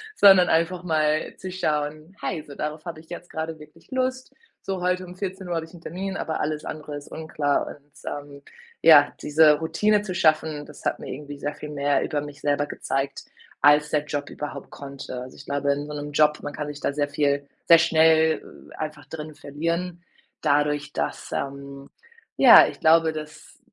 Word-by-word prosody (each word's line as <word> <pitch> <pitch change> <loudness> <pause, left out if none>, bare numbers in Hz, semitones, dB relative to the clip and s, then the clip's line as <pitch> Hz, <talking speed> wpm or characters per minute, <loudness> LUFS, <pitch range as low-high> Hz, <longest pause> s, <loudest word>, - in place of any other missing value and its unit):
sondern 190 - +7
einfach 170 +2 +1
mal 155 -2 0
zu 185 - -7
schauen: 155 -1 -2
”Hey, 160 -5 -3
so 145 - -10
darauf 150 +1 -5
habe 165 -2 -6
ich 160 - -18
jetzt 175 0 -8
grade 160 0 -4
wirklich 155 +2 -17
Lust. 260 0 -2 0.3
So, 190 -1 -2
heute 180 +1 0
um 180 0 -11
14:00 190 -2 -4
habe 165 -1 -2
ich 160 - -19
'n 175 - -13
Termin, 190 +3 -5
aber 160 -4 -3
alles 150 0 -2
andere 150 -1 -6
ist 145 0 -9
unklar.“ 155 -2 -1
und, 145 0 -12
ähm 145 -1 -7 0.4
ja, 145 -3 +8
diese 150 0 +5
Routine 205 +6 +2
zu 200 -3 -5
schaffen, 155 -3 +1
das 150 - -14
hat - - -1
mir - - -8
irgendwie 145 -1 -8
sehr 145 +1 -3
viel 150 - -8
mehr 145 -1 +1
über 150 - -1
mich 145 0 -8
selber 145 0 +1
gezeigt, 135 -1 -3 0.4
als 150 +1 +5
der 150 -1 +1
Job 145 -1 -4
überhaupt 150 - -7
konnte. 135 -2 -7
Also, 130 +1 -10
ich - - -12
glaube, 140 0 0
in 145 +1 -2
so 150 - -7
‘nem 145 0 -5
Job 150 +1 +3
man 145 - -4
kann 150 0 -4
sich 145 -1 -7
da - - 0
sehr 145 0 0
viel 145 -1 0 0.2
sehr 170 - +8
schnell, 160 -1 +4 0.3
äh, - - -11
einfach 155 -2 -6
drinnen 155 0 -8
verlieren, 170 +5 -3 0.4
dadurch, 145 0 +1
dass - - -3
ähm 140 0 -5 0.5
ja, - - +9
ich - - -9
glaube, 160 0 +5
dass 155 0 -9
150 Hz, 190 wpm, -24 LUFS, 145-165 Hz, 0.5 s, ja